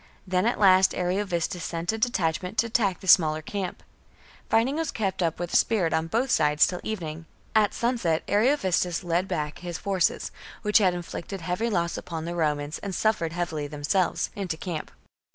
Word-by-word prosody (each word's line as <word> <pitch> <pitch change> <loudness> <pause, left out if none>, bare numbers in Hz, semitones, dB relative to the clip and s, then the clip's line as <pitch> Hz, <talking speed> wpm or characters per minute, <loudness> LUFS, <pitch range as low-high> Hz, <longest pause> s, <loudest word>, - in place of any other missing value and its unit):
Then 185 +2 +1
at 240 - +1
last 190 -2 +5
Ariovistus 180 -2 -1
sent 170 +2 -2
a 220 - -3
detachment 185 -3 -1
to - - +3
attack 215 -5 0
the 190 - -9
smaller 155 -4 +5
camp. 190 +1 -5 0.7
Fighting 235 +5 +2
was 325 -2 -1
kept 195 -4 -2
up 165 -2 0
with 175 0 -4
spirit 190 -8 +3
on 160 0 0
both 240 +8 0
sides 150 -4 +4
till 180 -1 -3
evening. 165 -6 -5 0.3
At 215 -2 +3
sunset 230 -10 0
Ariovistus 200 - +1
led 175 +2 0
back 150 -5 -3
his 175 -1 -5
forces, 195 -3 0 0.3
which 210 +1 +5
had 185 -4 +3
inflicted 175 +2 -6
heavy 180 +7 -1
loss 170 -5 0
upon 165 -2 -6
the 170 - -3
Romans 150 -2 -1
and 200 -3 -5
suffered 175 -7 0
heavily 165 -4 -2
themselves, 150 +5 0
into 180 -5 -3
camp. 165 -3 -5
180 Hz, 170 wpm, -26 LUFS, 165-205 Hz, 0.7 s, last